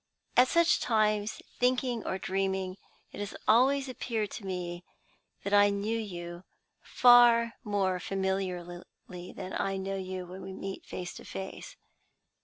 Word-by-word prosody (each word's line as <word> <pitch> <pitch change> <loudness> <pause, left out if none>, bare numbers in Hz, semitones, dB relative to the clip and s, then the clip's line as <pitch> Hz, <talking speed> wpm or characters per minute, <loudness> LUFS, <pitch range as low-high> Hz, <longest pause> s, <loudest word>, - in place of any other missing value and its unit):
At 250 +1 +7
such 335 +4 +4
times, 215 -2 +1 0.2
thinking 250 -2 +1
or 190 - -1
dreaming, 190 -1 -2 0.3
it - - -9
has 205 -1 -5
always 265 +5 +4
appeared 230 -4 -3
to 205 - -7
me 175 -1 -4 0.6
that 200 - -2
I 205 0 +7
knew 200 +3 -1
you 175 -4 -6 0.4
far 240 -1 +6
more 195 -4 0
familiarly 180 -2 -4
than 185 - -7
I 195 0 -1
know 195 +1 -3
you 185 -1 -5
when 185 +2 -9
we 190 - -7
meet 195 0 -7
face 180 -1 -5
to - - -10
face. 190 - -7
195 Hz, 140 wpm, -30 LUFS, 185-230 Hz, 0.6 s, At